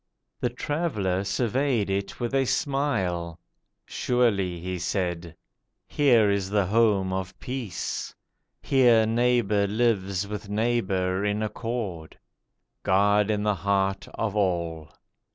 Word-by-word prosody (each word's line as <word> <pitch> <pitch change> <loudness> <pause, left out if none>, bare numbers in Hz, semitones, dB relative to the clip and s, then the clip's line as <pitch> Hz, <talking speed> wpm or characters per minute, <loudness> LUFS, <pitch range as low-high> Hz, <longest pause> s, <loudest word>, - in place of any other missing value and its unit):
The 125 - 0
Traveller 120 - -1
surveyed 120 +2 0
it 100 0 -3
with 120 +1 -3
a 135 -1 +2
smile. 95 - -1 0.5
'Surely,' 100 -8 0
He 90 +1 -4
said, 85 -2 -2 0.5
'here 120 -7 +4
is 100 -1 -1
the 100 -1 +2
home 100 -2 +2
of 95 -1 -4
peace; 125 -7 -4 0.5
Here 120 -5 +4
neighbour 115 -3 +2
lives 100 -3 0
with 105 0 -6
neighbour 100 -4 0
in 105 +1 0
accord; 105 -7 -4 0.6
God 100 +2 +3
in 105 -1 0
the 105 0 +2
heart 95 +1 0
of 105 -2 -2
all. 85 -6 -1
105 Hz, 115 wpm, -26 LUFS, 95-120 Hz, 0.6 s, here